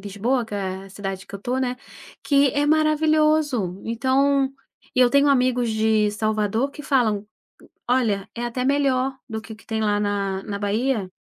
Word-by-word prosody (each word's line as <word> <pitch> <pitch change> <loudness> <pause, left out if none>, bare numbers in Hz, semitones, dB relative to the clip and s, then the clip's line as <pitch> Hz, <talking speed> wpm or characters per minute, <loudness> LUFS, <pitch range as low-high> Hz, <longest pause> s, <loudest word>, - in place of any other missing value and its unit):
Lisboa, 220 +6 -1
que 210 - -8
é 190 -1 -4
a 195 - -14
cidade 195 -1 -6
que 200 - -11
eu - - -5
estou, 250 +5 -2
né, 250 -1 -1 0.5
que 280 -1 +4
é 290 +2 0
maravilhoso. 305 - +2
Então 265 +4 +1 0.4
e 255 - +3
eu 245 -1 +5
tenho 280 +1 +4
amigos 250 -3 +2
de 220 -1 +2
Salvador 215 +4 0
que 295 - -10
falam, 220 -7 +1 0.6
olha, 220 -5 +1
é 240 - -4
até 250 +1 -3
melhor 270 -1 +1
do 220 0 -4
que 220 - -10
o - - -11
que 220 - -20
tem 220 -1 -2
lá 205 -1 +1
na 200 -2 -1
na 200 -1 -4
Bahia. 210 -1 -1
235 Hz, 180 wpm, -23 LUFS, 205-270 Hz, 0.6 s, eu